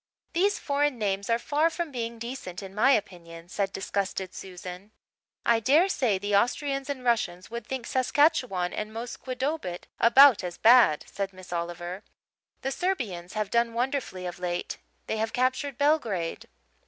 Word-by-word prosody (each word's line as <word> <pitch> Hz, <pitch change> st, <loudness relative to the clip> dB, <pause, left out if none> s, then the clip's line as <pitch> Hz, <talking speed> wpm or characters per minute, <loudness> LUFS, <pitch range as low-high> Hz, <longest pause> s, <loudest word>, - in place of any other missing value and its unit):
"These 395 Hz, +4 st, +2 dB
foreign 285 Hz, -2 st, 0 dB
names 200 Hz, -2 st, -1 dB
are 230 Hz, -, +4 dB
far 300 Hz, +6 st, +1 dB
from 335 Hz, -2 st, -4 dB
being 235 Hz, -2 st, -4 dB
decent, 230 Hz, -6 st, -6 dB
in 190 Hz, 0 st, -9 dB
my 215 Hz, +6 st, +3 dB
opinion," 170 Hz, -7 st, -1 dB
said 195 Hz, +1 st, -1 dB
disgusted 195 Hz, -1 st, -3 dB
Susan. 185 Hz, +1 st, -9 dB, 0.6 s
"I 235 Hz, -1 st, +4 dB
dare 295 Hz, -, +4 dB
say 240 Hz, -, +1 dB
the 205 Hz, +1 st, -1 dB
Austrians 275 Hz, +5 st, 0 dB
and 270 Hz, -3 st, -4 dB
Russians 210 Hz, -6 st, 0 dB
would 235 Hz, -2 st, -6 dB
think 260 Hz, -3 st, -4 dB
Saskatchewan 255 Hz, -, +2 dB
and 215 Hz, 0 st, -4 dB
Musquodoboit 250 Hz, -, -4 dB
about 250 Hz, -2 st, +7 dB
as 175 Hz, -1 st, -5 dB
bad, 230 Hz, -10 st, +6 dB
Susan," -, -, -20 dB
said 195 Hz, -1 st, -3 dB
Miss 185 Hz, -1 st, -10 dB
Oliver. 175 Hz, +2 st, -4 dB, 0.6 s
"The 270 Hz, -, -1 dB
Serbians 230 Hz, -, -2 dB
have 215 Hz, -2 st, -2 dB
done 235 Hz, -1 st, +1 dB
wonderfully 245 Hz, -7 st, -2 dB
of 175 Hz, 0 st, -6 dB
late. 175 Hz, -1 st, -3 dB, 0.3 s
They 220 Hz, -, -2 dB
have 220 Hz, +1 st, -2 dB
captured 260 Hz, +1 st, 0 dB
Belgrade." 230 Hz, -, 0 dB
225 Hz, 155 wpm, -27 LUFS, 185-265 Hz, 0.6 s, about